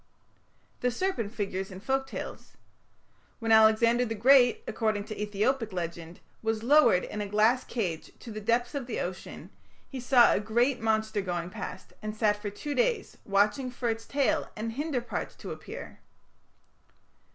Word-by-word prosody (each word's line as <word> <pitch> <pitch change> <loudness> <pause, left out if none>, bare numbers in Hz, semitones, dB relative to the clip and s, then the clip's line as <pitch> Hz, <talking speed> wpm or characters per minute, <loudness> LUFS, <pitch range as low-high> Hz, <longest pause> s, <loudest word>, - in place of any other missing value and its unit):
The 250 - +1
serpent 245 - -2
figures 195 -4 -3
in 185 -1 -9
folk 265 +5 -1
tales. - - -8 0.8
When 225 -2 -2
Alexander 220 +2 +5
the 225 -2 -3
Great, 245 +2 +5
according 215 -2 0
to 215 0 -7
Ethiopic 215 +3 0
legend, 170 -1 -5 0.2
was 225 0 -1
lowered 285 -8 +5
in 210 - -5
a 205 - -3
glass 220 +5 +3
cage 180 -9 -3
to 235 - -10
the 215 0 -6
depths 235 +3 +1
of 275 -4 -4
the 235 - -3
ocean, 180 +1 -6 0.4
he 265 - -7
saw 245 -1 +5
a - - +1
great 240 +5 +1
monster 220 -1 +1
going 175 -2 -3
past, 220 - -7
and 215 0 -5
sat 210 -1 +1
for 205 - -3
two 285 +9 -5
days 485 +1 0
"watching 210 +7 +2
for 245 -1 -3
its 225 0 -3
tail 275 -1 +1
and 225 +1 -3
hinder 280 +1 -2
parts 235 - -5
to - - -8
appear". - - -9
225 Hz, 165 wpm, -29 LUFS, 205-250 Hz, 0.8 s, Alexander